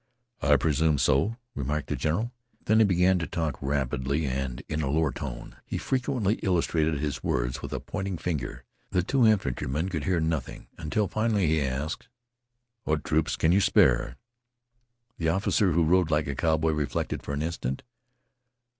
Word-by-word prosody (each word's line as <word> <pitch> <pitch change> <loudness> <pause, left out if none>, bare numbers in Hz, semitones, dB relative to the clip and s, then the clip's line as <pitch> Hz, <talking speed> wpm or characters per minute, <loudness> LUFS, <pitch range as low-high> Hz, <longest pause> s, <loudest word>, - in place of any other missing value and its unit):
"I 75 0 +5
presume 75 +2 +2
so," 75 - +2 0.2
remarked 75 +2 -3
the - - 0
general. 105 +10 -1 0.3
Then 110 +1 +4
he 110 - +7
began 90 -1 +3
to 80 - -3
talk 80 -4 -3
rapidly 70 +1 -1
and 65 -2 -3
in 80 0 -2
a 70 - -1
lower 75 0 +2
tone. - - -7
He - - -4
frequently 125 -5 0
illustrated 80 -4 +1
his 70 -3 -3
words 60 +2 -1
with 70 - -6
a 65 - -2
pointing 95 +5 -4
finger. 65 -8 -3 0.3
The 90 -3 +1
two 125 +4 +3
infantrymen 80 - 0
could 80 -5 -3
hear 90 -2 +2
nothing 80 -4 -2
until 100 +7 -1
finally 110 0 +1
he 80 0 +2
asked: 70 +3 -3 0.8
"What 75 -4 0
troops 80 0 +1
can 80 - +2
you 100 +3 +4
spare?" - - +3 1.0
The 80 -1 +1
officer 95 +2 +2
who 85 +1 +3
rode 90 0 +3
like 75 -1 +2
a 70 - -3
cowboy 80 +2 +1
reflected 75 -2 -2
for 70 - -5
an 75 - -2
instant. 70 -5 -3
80 Hz, 165 wpm, -27 LUFS, 70-90 Hz, 1.0 s, he